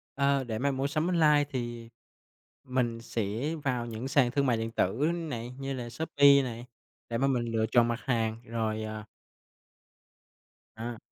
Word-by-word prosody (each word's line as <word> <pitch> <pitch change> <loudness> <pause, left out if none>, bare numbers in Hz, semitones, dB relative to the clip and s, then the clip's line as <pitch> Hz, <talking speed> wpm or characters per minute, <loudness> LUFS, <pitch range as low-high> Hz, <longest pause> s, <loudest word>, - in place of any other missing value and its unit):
Ờ, 140 -1 +2
để 110 -3 -4
mà 140 +1 +1
mua 135 +1 -1
sắm 155 +4 0
online 155 -4 +4
thì 120 -3 -5 0.7
mình 120 -3 -1
sẽ 115 +8 -2
vào 125 -3 0
những 115 +3 -5
sàn 135 -3 +3
thương 140 +1 +1
mại 120 -3 +2
điện 115 0 -3
tử 125 - +1
này, 125 -9 -4
như 135 0 -3
là 120 -2 -5
Shopee 140 +1 +5
này 120 -1 -5 0.4
để 115 - -1
mà 135 +2 +2
mình 125 -3 +1
lựa 110 -1 +1
chọn 120 -1 +5
mặt 120 +1 -1
hàng 115 -3 0
rồi, 110 -1 -2
ờ 110 0 -5 1.7
À. 115 +1 -5
120 Hz, 165 wpm, -29 LUFS, 115-140 Hz, 1.7 s, Shopee